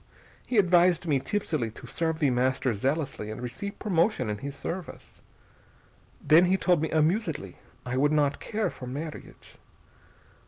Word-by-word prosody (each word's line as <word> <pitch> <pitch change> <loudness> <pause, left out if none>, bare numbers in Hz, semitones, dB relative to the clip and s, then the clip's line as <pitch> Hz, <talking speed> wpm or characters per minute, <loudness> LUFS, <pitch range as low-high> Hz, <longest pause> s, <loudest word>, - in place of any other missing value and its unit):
He 245 - -1
advised 180 -3 +4
me 145 -5 +2
tipsily 150 - -2
to 110 - -12
serve 160 -1 -2
The 145 -4 +2
Master 130 +1 +1
zealously 135 0 -2
and 110 - -6
receive 125 +12 -6
promotion 170 - +1
in 105 - -4
his 140 +1 -6
service. 175 +3 -7 1.0
Then, 165 +4 +5
he 185 +2 +3
told 180 -4 +2
me 160 - -1
amusedly, 155 - 0 0.3
I 125 +1 -2
would 145 +2 +3
not 145 -2 +2
care 220 0 -2
for 125 - -9
marriage. 150 +5 -8
155 Hz, 150 wpm, -27 LUFS, 130-175 Hz, 1.0 s, Then